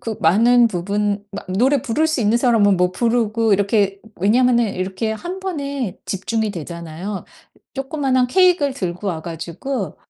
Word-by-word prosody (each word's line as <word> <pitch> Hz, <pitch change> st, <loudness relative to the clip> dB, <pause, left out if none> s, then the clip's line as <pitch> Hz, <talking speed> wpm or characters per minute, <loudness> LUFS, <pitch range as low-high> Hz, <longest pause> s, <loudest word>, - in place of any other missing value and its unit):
그 225 Hz, -3 st, -4 dB
많은 235 Hz, +8 st, +5 dB
부분 205 Hz, +1 st, -1 dB
마 195 Hz, -, -6 dB
노래 250 Hz, +9 st, +2 dB
부를 245 Hz, +8 st, 0 dB
수 315 Hz, -4 st, -1 dB
있는 220 Hz, +1 st, +3 dB
사람은 225 Hz, -5 st, +3 dB
뭐 180 Hz, 0 st, +2 dB
부르고 230 Hz, 0 st, +1 dB
이렇게 200 Hz, 0 st, +1 dB, 0.2 s
왜냐하면은 235 Hz, +2 st, +2 dB
이렇게 190 Hz, +4 st, -2 dB
한번에 280 Hz, -, -4 dB
집중이 220 Hz, +3 st, -2 dB
되잖아요. 170 Hz, +2 st, -6 dB, 0.5 s
조그마한 270 Hz, -2 st, 0 dB
케익을 355 Hz, -2 st, +3 dB
들고 180 Hz, -4 st, -4 dB
와 160 Hz, -4 st, -3 dB
가지고, 170 Hz, -, -5 dB
220 Hz, 320 characters per minute, -20 LUFS, 190-255 Hz, 0.5 s, 많은